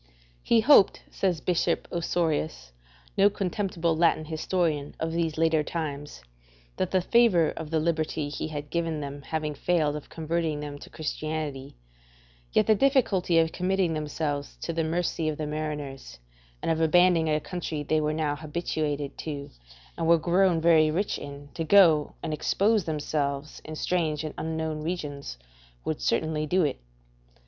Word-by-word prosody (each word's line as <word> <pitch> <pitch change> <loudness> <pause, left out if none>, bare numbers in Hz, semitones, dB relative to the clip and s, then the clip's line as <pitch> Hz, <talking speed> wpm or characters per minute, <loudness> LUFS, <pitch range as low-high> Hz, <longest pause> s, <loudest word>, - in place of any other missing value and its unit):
He 230 - +3
hoped, 235 -5 +5
says 180 -5 0
Bishop 180 -2 0
Osorius, 160 - -1 0.4
no 200 +1 +5
contemptible 185 -4 -1
Latin 160 -1 +2
historian 155 -2 -1
of 160 0 -2
these 165 -2 -1
later 160 -1 +3
times, 145 - -5 0.5
that - - 0
the 185 - +2
favour 185 -6 +4
of 160 -2 -7
the 160 0 +1
liberty 155 -2 -1
he 145 - -4
had 145 -2 -6
given 165 -2 -1
them 145 0 -6
having 155 +1 -3
failed 150 0 +1
of 150 - -8
converting 160 -1 -2
them 145 -1 -6
to - - -12
Christianity, 155 -3 -4 0.8
yet - - +3
the 220 - +5
difficulty 215 - +2
of 160 0 +3
committing 185 -2 0
themselves 150 -1 -3
to 165 - -3
the 165 0 0
mercy 165 0 -1
of 150 - -3
the 155 - -3
mariners 150 - -5 0.5
and - - +1
of 160 0 0
abandoning 165 0 +4
a 155 0 +2
country 160 -2 -4
they 155 +1 +1
were 150 0 0
now 155 -2 -1
habituated 150 -2 -3
to 145 -3 -5 0.5
and 165 - 0
were 170 0 +6
grown 175 +1 +3
very 160 -1 +5
rich 190 +7 -1
in, 145 0 -9
to 165 - -3
go 160 -4 +5
and 155 - -2
expose 205 +6 +2
themselves 150 -2 -2
in 155 - -7
strange 160 -2 -1
and 155 - -5
unknown 160 -1 -3
regions, 145 - -4 0.5
would - - -2
certainly 155 - 0
do 185 +3 +2
it. 145 -3 -1
160 Hz, 155 wpm, -27 LUFS, 150-170 Hz, 0.8 s, were